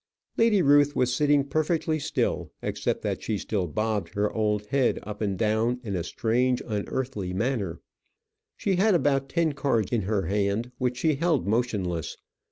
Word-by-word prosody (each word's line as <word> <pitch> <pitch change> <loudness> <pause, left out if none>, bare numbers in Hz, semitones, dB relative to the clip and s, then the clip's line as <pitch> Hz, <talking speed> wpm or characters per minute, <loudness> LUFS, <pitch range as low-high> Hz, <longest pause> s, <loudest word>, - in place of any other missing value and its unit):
Lady 220 -5 +4
Ruth 145 0 +5
was 125 -1 +2
sitting 145 +1 +3
perfectly 155 +2 0
still, - - -1
except - - -2
that - - -2
she 110 - -2
still 95 -2 -2
bobbed 110 +4 -2
her 105 +1 0
old 105 -1 0
head 135 -3 +2
up 105 0 -7
and 100 -3 -1
down 110 +3 +1
in 100 -4 -3
a 85 - -1
strange 120 +7 +1
unearthly 105 -2 -3
manner. 100 -5 -1 0.8
She 195 -3 0
had 200 +1 +4
about 135 -4 +1
ten 165 -3 +1
cards 135 -7 0
in 120 -3 +1
her 100 0 0
hand 100 +6 -1
which 125 -1 0
she 155 0 +1
held 165 -2 +1
motionless. 100 -7 -1
120 Hz, 165 wpm, -26 LUFS, 105-140 Hz, 0.8 s, Ruth